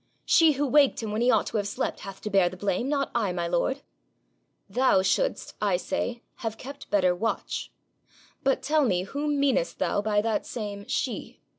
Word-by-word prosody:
'She 325 -3 +5
who 285 +1 0
waked 280 -3 +4
him 215 - -3
when 215 +2 -1
he 245 - +3
ought - - +4
to - - -2
have 205 -1 -1
slept 205 - -3
hath 195 -1 -8
to 210 - -5
bear 190 -3 +4
the 185 - -10
blame, 200 +6 -1
not 280 -2 0
I, 220 -5 +1
my 175 -1 -2
lord.' 180 +11 0 0.8
'Thou 210 -2 +3
shouldst, - - 0
I 200 -4 +2
say, 235 +5 -3
have 225 -1 -4
kept 275 +4 -9
better 185 -3 +3
watch. 225 +6 -3 0.7
But 270 -1 +1
tell 300 +2 +3
me 185 -8 +1
whom 285 +7 -2
meanest 280 - +1
thou - - 0
by 210 0 +1
that 220 0 -1
same 205 -3 -5
SHE?' - - -3
225 Hz, 190 wpm, -27 LUFS, 195-275 Hz, 0.8 s, She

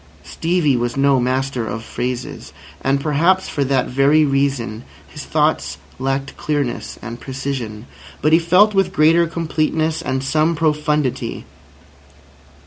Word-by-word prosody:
Stevie 165 -5 0
was 120 +1 -2
no 135 -1 +3
master 130 -1 -1
of 115 - -5
phrases, 125 +1 -5 0.3
and 135 +1 +1
perhaps 165 +6 +2
for 145 - -1
that 135 -1 +1
very 140 +4 +3
reason 135 -5 -1 0.2
his - - -9
thoughts 75 +1 0 0.2
lacked 135 +1 -2
clearness 145 -5 -2
and 120 0 -7
precision. 130 -5 -5 0.3
But 155 +1 +2
he 165 - +7
felt 180 +6 +4
with 195 -2 +1
greater 165 +2 +4
completeness 160 -1 -1
and 130 0 -2
some 155 +4 +1
profundity. 150 -3 -1
140 Hz, 130 wpm, -19 LUFS, 130-155 Hz, 0.3 s, he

